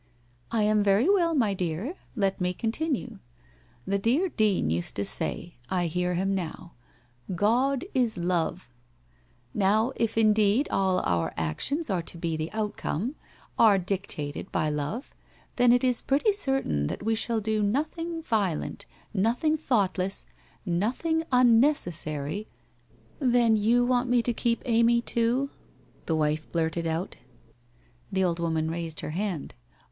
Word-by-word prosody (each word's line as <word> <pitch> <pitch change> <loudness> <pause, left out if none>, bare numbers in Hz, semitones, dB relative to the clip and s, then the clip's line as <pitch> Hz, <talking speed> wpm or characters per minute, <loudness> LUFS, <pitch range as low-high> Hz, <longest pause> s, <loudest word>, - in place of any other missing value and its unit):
' 120 0 -35
I 225 -2 +2
am 210 0 +3
very 205 - +3
well, 350 -5 +3
my 225 -8 +2
dear. 185 - -3 0.2
Let 195 -4 0
me 180 0 +1
continue. 240 -2 -2 0.7
The 200 0 0
dear 265 - +2
Dean 210 - +1
used 85 +1 -2
to 100 - -1
say 175 - -3
— 120 - -28
I 180 -2 0
hear 180 +2 -1
him 195 +2 0
now 175 -1 -5 0.2
— 120 0 -34
" 180 +9 -6
God 255 +6 +2
is 245 -6 +1
love 175 -4 -1 0.4
"... - - -36
Now, 215 +5 +2
if 225 -1 -1
indeed 215 +4 +4
all 190 -1 +2
our 85 -1 -1
actions 225 - -1
are 180 -3 +1
to 170 - -7
be 165 -1 -2
the 155 +1 -3
outcome 215 - -2 0.2
— - - -26
are 215 -3 +7
dictated 180 -6 -3
by 155 -1 0
love, 150 - -4 0.4
then 245 -1 +5
it 245 +1 +4
is 250 -2 +2
pretty 295 +11 +2
certain 270 - -1
that - - -5
we 225 +1 +1
shall 225 +1 0
do 215 0 0
'nothing 315 +9 -1
violent, 200 - -1 0.3
nothing 235 - +2
thoughtless, 195 -10 0 0.4
nothing 235 - 0
unneces 250 - +4
sary 155 +5 -4 0.3
' - - -34
' - - -31
Then 240 -4 +4
you 230 +4 +3
want 245 0 +1
me 245 -1 +3
to 240 - 0
keep 235 0 0
Amy 235 0 +4
too? 240 +5 0 0.3
' - - -31
the 160 - +1
wife 155 0 -1
blurted 165 0 -1
out. 165 +3 -3 0.9
The 190 0 +1
old 170 -2 0
woman 160 -1 0
raised 165 -2 -4
her - - -4
hand. 180 -3 -3
205 Hz, 160 wpm, -27 LUFS, 170-245 Hz, 0.9 s, are